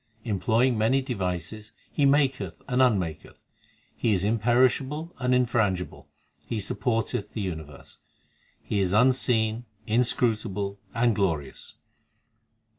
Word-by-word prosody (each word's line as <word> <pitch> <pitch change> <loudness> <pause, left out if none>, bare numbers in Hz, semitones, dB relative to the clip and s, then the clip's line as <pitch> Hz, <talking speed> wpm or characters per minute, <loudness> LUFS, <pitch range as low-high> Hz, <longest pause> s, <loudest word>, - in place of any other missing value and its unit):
Employing 115 +3 +1
many 115 +5 +3
devices 100 - -4 0.2
He 140 - +2
maketh 135 -2 +1
and 130 -1 +1
unmaketh. 95 - 0 0.6
He 110 -3 +1
is 90 - -1
imperishable 130 - +1
and 125 -1 0
infrangible; 110 -7 0 0.4
He 115 - -4
supporteth 110 0 -2
the 110 - -3
universe; 80 -7 -7 0.6
He 105 - -1
is 95 -1 +1
unseen, 120 -1 +2 0.2
inscrutable, 110 -4 0 0.2
and 115 0 +3
glorious. 80 -9 -2
110 Hz, 105 wpm, -26 LUFS, 100-125 Hz, 0.6 s, many